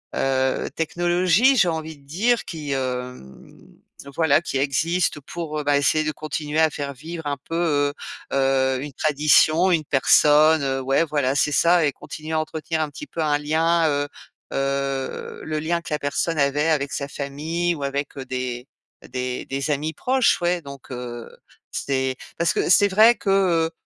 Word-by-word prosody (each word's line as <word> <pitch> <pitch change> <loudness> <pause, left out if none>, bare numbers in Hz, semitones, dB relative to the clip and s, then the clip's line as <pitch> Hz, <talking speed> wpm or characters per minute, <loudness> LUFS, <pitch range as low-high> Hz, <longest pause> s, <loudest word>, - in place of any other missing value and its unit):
heu, 130 -1 0
technologies, 175 - +2
j'ai 190 - +4
envie 160 -1 -4
de 140 - -23
dire, 220 - +1
qui, 155 -4 -6
hem, 125 - -5 0.6
voilà, 160 -2 +3
qui 140 - -3
existent 155 +5 0
pour, 155 -3 -4
bah, 145 0 +3
essayer 155 +2 +2
de 155 - -1
continuer 155 0 -3
à 160 0 +5
faire 140 -1 -5
vivre 160 +4 -8
un 145 -1 -2
peu, 165 - -5
heu 145 -4 +1 0.4
heu, 135 -1 +2
une 145 - -6
tradition, 155 +5 +3
une 160 -3 +1
personne. 150 +3 +4
Heu, 135 -1 -1
ouais, 135 +4 +2
voilà, 145 -4 0
c'est 145 +1 +2
ça. 170 +2 +4
Et 145 - +1
continuer 155 +3 -8
à 160 - +2
entretenir, 160 +1 -3
un 155 - -1
petit 145 - -9
peu, 165 - -5
un 150 -2 +2
lien 160 +3 +1
heu 145 0 0 0.5
heu, 135 -1 -2
le 155 -1 -2
lien 170 +2 -1
que 170 - -6
la 150 - -1
personne 150 +3 -1
avait 145 +2 +2
avec 140 -3 0
sa 140 - -3
famille 155 +5 -2
ou 145 - -6
avec 140 +1 -3
des 125 -1 -4 0.4
des 125 0 -4
des 140 +3 -3
amis 150 +2 -2
proches. 260 0 +1
Ouais, 175 0 +1
donc, 140 -3 -11
heu, 120 -2 -7 0.4
c'est 130 -1 -1 0.2
parce 170 0 +2
que - - 0
c'est 200 +3 +6
vrai 220 +5 +6
que, 200 - -4
heu, 175 -4 +2
150 Hz, 175 wpm, -23 LUFS, 140-165 Hz, 0.6 s, c'est